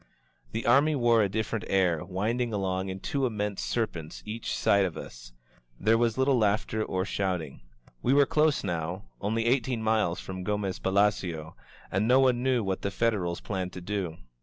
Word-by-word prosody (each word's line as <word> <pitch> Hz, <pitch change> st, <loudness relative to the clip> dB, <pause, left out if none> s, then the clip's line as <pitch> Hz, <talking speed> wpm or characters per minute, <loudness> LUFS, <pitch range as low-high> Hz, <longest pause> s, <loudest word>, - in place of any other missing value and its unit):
The 115 Hz, -, -3 dB
army 140 Hz, +6 st, +4 dB
wore 120 Hz, -3 st, +4 dB
a 100 Hz, -, +2 dB
different 110 Hz, +2 st, -2 dB
air, 90 Hz, -5 st, +2 dB
winding 115 Hz, +6 st, -1 dB
along 95 Hz, -2 st, -1 dB
in 95 Hz, 0 st, -5 dB
two 135 Hz, -2 st, 0 dB
immense 105 Hz, -3 st, -3 dB
serpents 85 Hz, -10 st, -3 dB
each 110 Hz, +2 st, -4 dB
side 100 Hz, -1 st, +3 dB
of 90 Hz, -4 st, -2 dB
us -, -, -10 dB, 0.3 s
— -, -, -35 dB
^there 110 Hz, +2 st, +4 dB
was 115 Hz, -1 st, +1 dB
little 130 Hz, -1 st, +3 dB
laughter 110 Hz, +1 st, +1 dB
or 95 Hz, -2 st, -2 dB
shouting. 90 Hz, -7 st, -2 dB, 0.4 s
We 125 Hz, -, +1 dB
were 140 Hz, +1 st, +6 dB
close 150 Hz, +1 st, +2 dB
now, 85 Hz, +2 st, -3 dB, 0.2 s
only 110 Hz, +3 st, 0 dB
eighteen 125 Hz, -1 st, +1 dB
miles 110 Hz, -6 st, +1 dB
from 95 Hz, -1 st, -6 dB
Gomez 100 Hz, -1 st, -2 dB
Palacio, 95 Hz, -5 st, 0 dB, 0.4 s
and 100 Hz, +4 st, +1 dB
no 125 Hz, +2 st, +6 dB
one 125 Hz, -2 st, +3 dB
knew 125 Hz, -3 st, +2 dB
what 95 Hz, -1 st, -2 dB
the 100 Hz, -, -1 dB
Federals 100 Hz, -5 st, 0 dB
planned 95 Hz, -3 st, -3 dB
to 90 Hz, -, -7 dB
do. 90 Hz, -3 st, -3 dB
105 Hz, 180 wpm, -28 LUFS, 95-115 Hz, 0.4 s, were